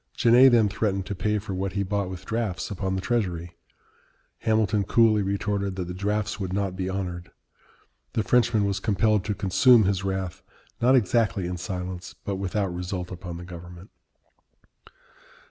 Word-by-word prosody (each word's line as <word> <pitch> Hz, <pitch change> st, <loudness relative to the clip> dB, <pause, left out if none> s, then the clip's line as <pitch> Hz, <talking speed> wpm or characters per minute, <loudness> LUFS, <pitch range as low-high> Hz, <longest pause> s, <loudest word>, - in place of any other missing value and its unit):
Genet 125 Hz, +3 st, +7 dB
then 115 Hz, -3 st, +5 dB
threatened 100 Hz, -2 st, -1 dB
to 100 Hz, -, -4 dB
pay 105 Hz, +2 st, 0 dB
for 100 Hz, -1 st, -5 dB
what 95 Hz, +1 st, -3 dB
he 100 Hz, 0 st, 0 dB
bought 100 Hz, -1 st, -2 dB
with 95 Hz, 0 st, -8 dB
drafts 110 Hz, -6 st, -2 dB
upon 95 Hz, -1 st, -2 dB
the 95 Hz, -, -2 dB
Treasury. 90 Hz, -7 st, -2 dB, 0.8 s
Hamilton 110 Hz, -2 st, +1 dB
coolly 110 Hz, +1 st, +4 dB
retorted 100 Hz, 0 st, -1 dB
that 90 Hz, -2 st, -4 dB
the 90 Hz, -, -5 dB
drafts 105 Hz, +3 st, -2 dB
would 95 Hz, -2 st, -3 dB
not 95 Hz, -1 st, -1 dB
be 95 Hz, 0 st, -3 dB
honored. 90 Hz, -2 st, -4 dB, 0.8 s
The 110 Hz, -, 0 dB
Frenchman 110 Hz, -2 st, +3 dB
was 100 Hz, 0 st, -1 dB
compelled 105 Hz, 0 st, +2 dB
to 105 Hz, -2 st, -1 dB
consume 110 Hz, +5 st, +5 dB
his 95 Hz, -1 st, 0 dB
wrath, 95 Hz, -2 st, -3 dB, 0.4 s
not 125 Hz, +3 st, +5 dB
exactly 110 Hz, -4 st, +2 dB
in 90 Hz, 0 st, -3 dB
silence, 90 Hz, 0 st, -5 dB
but 100 Hz, -1 st, -2 dB
without 95 Hz, 0 st, -2 dB
result 90 Hz, +1 st, -4 dB
upon 90 Hz, -2 st, -7 dB
the 90 Hz, -, -8 dB
government. 90 Hz, +1 st, -11 dB
100 Hz, 165 wpm, -25 LUFS, 90-105 Hz, 0.8 s, Genet